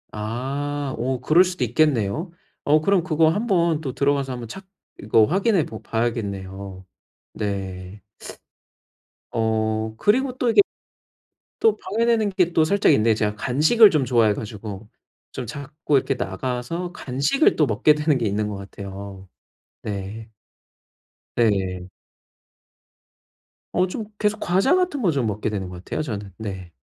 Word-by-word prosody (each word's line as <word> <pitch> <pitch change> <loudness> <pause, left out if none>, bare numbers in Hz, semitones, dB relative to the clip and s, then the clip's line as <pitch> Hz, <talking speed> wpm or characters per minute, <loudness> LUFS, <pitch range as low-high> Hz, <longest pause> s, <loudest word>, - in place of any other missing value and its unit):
아. 135 +6 -3
어 125 +2 -1
그럴 160 +7 +5
수도 180 -7 -2
있겠네요. 135 - +1 0.3
어 150 +1 +4
그럼 190 +1 +2
그거 160 -2 +3
한번 170 -5 +1
또 135 -5 -4
들어가서 140 -1 0
한번 120 -2 -6
찾 190 - -9 0.3
이거 110 +1 +4
확인해 190 - +2
보 110 - -9
봐야겠네요. 100 -5 -4 0.5
네. 95 -1 -5 1.3
어 110 -1 -1
그리고 255 - +1
또 250 -2 +1
이게 230 - +6 1.0
또 445 -1 +3
방해되는 220 +1 +1
게 180 -2 +1
또 160 - +4
살짝 200 +5 +3
있는데 110 +1 +3
제가 105 -1 -1
간식을 155 - +5
좀 150 -4 +1
좋아해 115 -4 +3
가지고 105 -1 -7 0.4
좀 125 - -5
자꾸 145 +3 -2
이렇게 135 +1 +1
나가서 125 - -4
간식을 140 - +1
또 150 - +3
먹게 130 +6 +3
되는 150 -1 +1
게 115 - -1
있는 105 +1 -1
것 105 - -5
같아요. 100 0 -9 0.5
네. 105 +2 -6 1.1
네. 95 -5 0 1.9
어 185 +1 +2
좀 215 +4 -5
계속 210 0 0
과자 190 - +2
같은 360 -7 0
거 185 -7 +3
좀 135 -6 0
먹게 105 +1 -2
되는 95 -3 -4
것 90 0 -10
같아요, - - -3
저는. 105 -9 -5
네. 95 -5 -6
125 Hz, 255 characters per minute, -23 LUFS, 105-170 Hz, 1.9 s, 이게